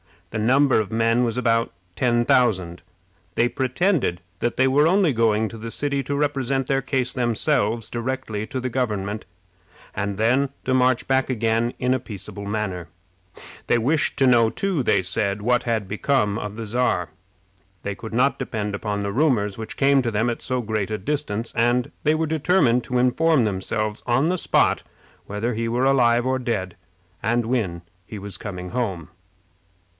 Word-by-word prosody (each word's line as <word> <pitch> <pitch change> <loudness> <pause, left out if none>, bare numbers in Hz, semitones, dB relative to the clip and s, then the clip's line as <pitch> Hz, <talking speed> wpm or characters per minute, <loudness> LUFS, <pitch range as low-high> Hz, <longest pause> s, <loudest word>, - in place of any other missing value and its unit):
The 110 - -3
number 130 +4 +4
of 110 -1 -3
men 115 +2 +2
was 115 0 -2
about 115 -2 +1 0.2
ten 120 +2 +2
thousand. 95 -10 +2 0.5
They 120 - +3
pretended 130 - 0 0.2
that 120 - -1
they 130 - +3
were 145 +4 +4
only 185 -2 +3
going 110 -1 +2
to 115 - -9
the 115 +1 -6
city 140 +3 -1
to 140 +2 -3
represent 135 -2 0
their 135 +1 +1
case 130 -1 -1
themselves 115 -2 0
directly 120 -3 -3
to 130 - -4
the 130 0 -2
government, 105 -4 -2 0.7
and 100 -1 -3
then 125 +6 +2
to 130 - 0
march 130 -1 +3
back 135 0 +1
again 115 0 0
in 125 0 +1
a 130 - 0
peaceable 105 -3 -8
manner. 100 -5 -3 0.8
They 120 - +3
wished 145 +8 +1
to 135 - +4
know, 120 -3 +5
too, 190 +2 -1
they 95 -5 +2
said, 100 +2 -1
what 120 +3 +2
had 110 -4 -1
become 105 0 0
of 105 0 -5
the 115 0 -5
Czar. 110 -6 0 0.7
They 100 - -2
could 110 +3 -9
not 130 +4 +2
depend 110 -5 -3
upon 100 0 -2
the 100 0 -2
rumors 110 -6 +1
which 110 -1 -7
came 140 0 +4
to 120 -2 -2
them 110 +3 +1
at 115 - -6
so 130 -1 -1
great 110 -3 -2
a 110 - -2
distance, 115 -2 -3
and 120 +1 +2
they 155 +1 +3
were 160 +1 0
determined 150 -5 +2
to 125 - -1
inform 130 +3 +3
themselves 105 +1 -2
on 130 +5 +3
the 180 +2 +1
spot - - +2 0.5
whether 105 +4 -2
he 115 +1 -2
were 120 +3 +1
alive 120 -3 +3
or 130 0 +1
dead, 105 -8 -2 0.5
and 120 +2 +1
when 110 -9 -1 0.3
he 110 - -7
was 100 -2 -6
coming 90 -3 -6
home. 95 -9 -3
120 Hz, 175 wpm, -23 LUFS, 105-130 Hz, 0.8 s, know